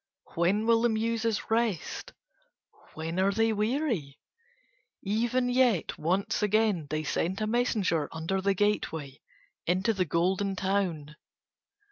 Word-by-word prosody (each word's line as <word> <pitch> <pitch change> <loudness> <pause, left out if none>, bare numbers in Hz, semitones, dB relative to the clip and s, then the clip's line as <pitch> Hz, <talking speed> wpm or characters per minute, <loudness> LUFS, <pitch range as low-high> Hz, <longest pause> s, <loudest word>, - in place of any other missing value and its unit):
When 185 +6 +1
will 230 0 +4
the 240 - +3
Muses 225 0 -1
rest? 225 -7 -1 0.8
When 165 +3 -3
are 195 +1 +3
they 225 +2 +2
weary? 215 - -1 0.9
Even 235 +5 +1
yet 245 -7 +2
once 185 +8 0
again 210 -6 +2
they 155 +1 -2
sent 175 +5 -1
a 215 - 0
messenger 215 -9 0
under 165 +4 -2
the 200 0 +1
gateway 160 -9 -1 0.5
into 190 +6 +2
the 190 -3 0
Golden 185 +5 0
Town. 180 -6 -1
200 Hz, 120 wpm, -28 LUFS, 170-225 Hz, 0.9 s, will